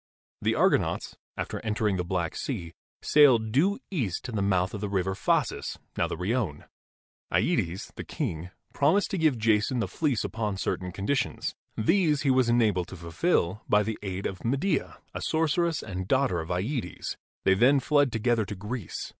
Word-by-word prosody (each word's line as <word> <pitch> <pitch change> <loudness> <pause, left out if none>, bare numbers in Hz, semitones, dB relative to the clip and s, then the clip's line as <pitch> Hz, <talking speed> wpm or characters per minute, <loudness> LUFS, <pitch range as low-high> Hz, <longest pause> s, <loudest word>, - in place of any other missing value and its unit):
The - - +1
Argonauts, - - +1 0.2
after - - -3
entering 105 -2 0
the 90 - -1
Black 85 -2 -2
Sea, 85 -1 -4 0.3
sailed 125 -7 +5
due 180 - +3
east 115 - -2
to 125 - -4
the 105 -3 -1
mouth 95 -2 +1
of 105 - -5
the 105 - -2
River 95 -1 0
Phasis, 95 - 0 0.2
now - - +1
the - - -4
Rione. 95 - -1 0.7
TEtes, 85 +3 0
the - - -6
king, 85 +2 -4 0.2
promised 160 +8 +2
to 190 - -1
give 155 -6 +3
Jason 110 +2 +2
the 115 - 0
fleece 145 -8 0
upon 105 -3 -2
certain 90 -1 -2
conditions. 100 +10 -1 0.2
These 155 - +2
he 135 - +3
was 130 -2 +3
enabled 105 -7 +2
to 95 - -9
fulfil 85 - 0
by 105 0 +4
the 110 0 -4
aid 95 -1 -4
of 95 - -4
Medea, 140 +7 0 0.2
a - - -5
sorceress 165 +1 +1
and 95 -1 -5
daughter 130 -8 +2
of 80 - -6
yEtes. 90 - -3 0.3
They 95 - +5
then 130 +8 +5
fled 145 0 +3
together 115 0 +1
to 105 - -6
Greece. 105 +1 -5
110 Hz, 170 wpm, -27 LUFS, 95-135 Hz, 0.7 s, sailed